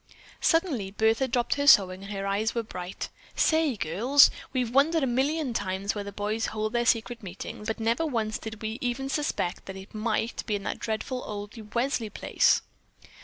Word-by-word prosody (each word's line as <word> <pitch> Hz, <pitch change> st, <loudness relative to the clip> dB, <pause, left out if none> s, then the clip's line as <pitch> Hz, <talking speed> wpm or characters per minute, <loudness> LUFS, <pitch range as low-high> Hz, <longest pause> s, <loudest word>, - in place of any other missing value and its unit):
Suddenly 320 Hz, -, +1 dB
Bertha 220 Hz, +5 st, +2 dB
dropped 245 Hz, -1 st, +1 dB
her 285 Hz, 0 st, -1 dB
sewing 190 Hz, -7 st, +6 dB
and 200 Hz, -, -8 dB
her 195 Hz, -1 st, -3 dB
eyes 205 Hz, +4 st, 0 dB
were 235 Hz, -, 0 dB
bright 180 Hz, -3 st, -6 dB, 0.3 s
"Say, 315 Hz, -6 st, +2 dB
girls, 230 Hz, -, +5 dB, 0.2 s
we've 250 Hz, -3 st, -1 dB
wondered 305 Hz, +3 st, +4 dB
a -, -, +4 dB
million 265 Hz, +2 st, 0 dB
times 195 Hz, -1 st, -1 dB
where 205 Hz, -, -4 dB
the 200 Hz, -, -7 dB
boys 210 Hz, +2 st, -2 dB
hold 215 Hz, +1 st, -3 dB
their 240 Hz, 0 st, +1 dB
secret 230 Hz, +1 st, +1 dB
meetings, 195 Hz, +2 st, -7 dB
but 220 Hz, +1 st, -2 dB
never 230 Hz, +7 st, +1 dB
once 225 Hz, -5 st, -1 dB
did 220 Hz, 0 st, -8 dB
we 220 Hz, +2 st, -3 dB
even 255 Hz, +2 st, -2 dB
suspect 290 Hz, -, -2 dB
that 190 Hz, 0 st, -6 dB
it 190 Hz, +1 st, -11 dB
might 220 Hz, +1 st, -1 dB
be 210 Hz, -, +1 dB
in 200 Hz, -, -4 dB
that -, -, -3 dB
dreadful 235 Hz, +3 st, -3 dB
old 205 Hz, -1 st, -6 dB, 0.2 s
Welsley 235 Hz, -2 st, 0 dB
place." -, -, +2 dB
225 Hz, 185 wpm, -27 LUFS, 205-255 Hz, 0.3 s, sewing